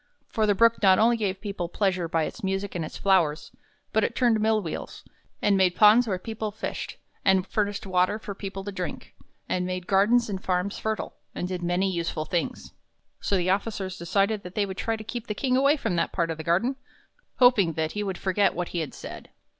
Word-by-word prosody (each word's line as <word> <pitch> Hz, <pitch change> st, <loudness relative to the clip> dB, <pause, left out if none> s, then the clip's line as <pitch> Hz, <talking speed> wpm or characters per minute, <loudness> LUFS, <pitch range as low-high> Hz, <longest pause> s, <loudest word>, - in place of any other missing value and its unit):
For 220 Hz, -1 st, +1 dB
the 205 Hz, -, +3 dB
Brook 230 Hz, +2 st, +4 dB
not 190 Hz, -2 st, +6 dB
only 235 Hz, +2 st, +4 dB
gave 195 Hz, -4 st, -2 dB
people 195 Hz, -5 st, -4 dB
pleasure 185 Hz, -3 st, 0 dB
by 165 Hz, -1 st, +1 dB
its 235 Hz, -, -6 dB
music 195 Hz, +1 st, -2 dB
and 170 Hz, -, -2 dB
its 155 Hz, -, -7 dB
flowers, 170 Hz, -6 st, +2 dB, 0.4 s
but 220 Hz, -, +3 dB
it 235 Hz, -, -1 dB
turned 235 Hz, -4 st, +3 dB
mill 220 Hz, 0 st, +3 dB
wheels, 170 Hz, -6 st, -6 dB, 0.4 s
and 205 Hz, -1 st, +4 dB
made 185 Hz, -2 st, +3 dB
ponds 220 Hz, +3 st, +6 dB
where 190 Hz, -3 st, 0 dB
people 220 Hz, +3 st, -4 dB
fished, 210 Hz, +2 st, -5 dB, 0.3 s
and 190 Hz, -1 st, +3 dB
furnished 205 Hz, 0 st, -2 dB
water 185 Hz, +2 st, +2 dB
for 210 Hz, -2 st, -7 dB
people 195 Hz, 0 st, -6 dB
to 205 Hz, -, -5 dB
drink, 185 Hz, -2 st, -6 dB, 0.3 s
and 180 Hz, -, 0 dB
made 180 Hz, 0 st, -3 dB
gardens 210 Hz, +5 st, +3 dB
and 195 Hz, -3 st, -4 dB
farms 185 Hz, +2 st, -1 dB
fertile, 220 Hz, -1 st, -3 dB, 0.2 s
and 180 Hz, -, -2 dB
did 180 Hz, -1 st, -3 dB
many 175 Hz, +2 st, +1 dB
useful 165 Hz, -3 st, -2 dB
things. 175 Hz, 0 st, -3 dB, 0.5 s
So 200 Hz, -, 0 dB
the 180 Hz, 0 st, +1 dB
officers 195 Hz, -2 st, -2 dB
decided 200 Hz, +5 st, +1 dB
that 180 Hz, 0 st, -10 dB
they 210 Hz, -, +2 dB
would 190 Hz, -1 st, -7 dB
try 225 Hz, -, -1 dB
to 215 Hz, -, -8 dB
keep 235 Hz, +1 st, -6 dB
the 210 Hz, -, -3 dB
King 255 Hz, +1 st, +1 dB
away 280 Hz, +3 st, +4 dB
from 225 Hz, -9 st, -1 dB
that -, -, 0 dB
part 170 Hz, -2 st, 0 dB
of 160 Hz, -, -6 dB
the -, -, -4 dB
garden, 190 Hz, -, +1 dB, 0.6 s
hoping 225 Hz, -10 st, +5 dB
that 160 Hz, 0 st, -1 dB
he 210 Hz, -, -3 dB
would 195 Hz, -3 st, -3 dB
forget 195 Hz, +1 st, +1 dB
what 175 Hz, 0 st, -3 dB
he 175 Hz, -, -3 dB
had 155 Hz, -4 st, -4 dB
said. -, -, -9 dB
195 Hz, 215 wpm, -26 LUFS, 180-215 Hz, 0.6 s, not